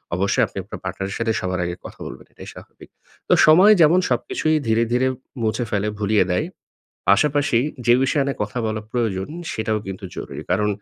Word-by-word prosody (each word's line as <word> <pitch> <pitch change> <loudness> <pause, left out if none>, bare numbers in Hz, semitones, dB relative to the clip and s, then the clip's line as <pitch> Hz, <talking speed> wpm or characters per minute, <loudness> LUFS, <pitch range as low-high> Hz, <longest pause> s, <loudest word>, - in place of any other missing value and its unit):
অবশ্যই 100 +7 +1
আপনি 100 - -13
আপনার 100 - -9
পার্টনারের 95 +1 -4
সাথে 115 -1 0
সবার 95 -1 -2
আগে 85 0 -3
কথা - - -10
বলবেন - - -10
এটাই - - -11
স্বাভাবিক। - - -14 0.4
তো - - +6
সময় 185 +7 +8
যেমন 165 +4 +6
সবকিছুই 155 +5 0
ধীরে, 115 +1 +3
ধীরে 130 +1 +2 0.3
মুছে 110 +2 0
ফেলে, 105 0 0
ভুলিয়ে 105 -1 +3
দেয়, 90 - 0 0.6
পাশাপাশি 140 +3 +3 0.3
যে 120 - +6
বিষয় 140 +2 +2
নিয়ে 140 - -4
কথা 105 +4 -4
বলা 110 0 -2
প্রয়োজন, 105 -6 -1 0.2
সেটাও 110 0 -1
কিন্তু 95 +1 -7
জরুরি। 70 +2 -6
কারণ 105 +3 +2
110 Hz, 180 wpm, -21 LUFS, 95-125 Hz, 0.6 s, সময়